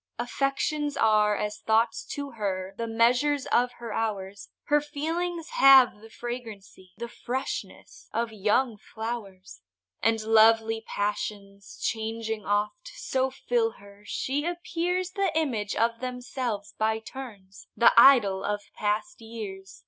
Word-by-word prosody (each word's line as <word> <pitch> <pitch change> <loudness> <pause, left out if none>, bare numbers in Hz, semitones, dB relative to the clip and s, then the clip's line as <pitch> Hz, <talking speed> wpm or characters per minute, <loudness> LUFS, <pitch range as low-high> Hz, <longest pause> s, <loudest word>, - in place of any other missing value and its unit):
Affections 275 +4 -1
are 210 -1 +3
as 210 0 -3
thoughts 225 +1 +1
to 285 -1 -5
her, 195 -4 -3
The 230 +2 -3
measures 250 +5 +2
of 245 +1 +2
her 235 -2 -7
hours; 200 -3 -3
Her 295 0 +3
feelings 325 +3 -3
have 265 -5 +7
the 225 - -13
flagrancy, 220 -6 -8
The 235 - -5
freshness 255 +3 -6
of 230 -1 -2
young 215 +3 +1
flowers; 205 - -7 0.4
And 225 +1 +2
lovely 225 0 +4
passions, 205 -1 -4
changing 220 -1 -3
oft, 210 +12 -1
So 265 0 -1
fill 240 -3 0
her, 200 0 -16
she 280 +3 -2
appears 350 +1 -2
The 390 -2 0
image 230 -10 -1
of 230 0 +1
themselves 245 -4 -4
by 220 0 +2
turns,— 220 -5 -10
The 235 - +6
idol 225 -7 +6
of 205 0 -2
past 215 +11 -2
years! 205 -4 -8
225 Hz, 125 wpm, -27 LUFS, 210-265 Hz, 0.4 s, have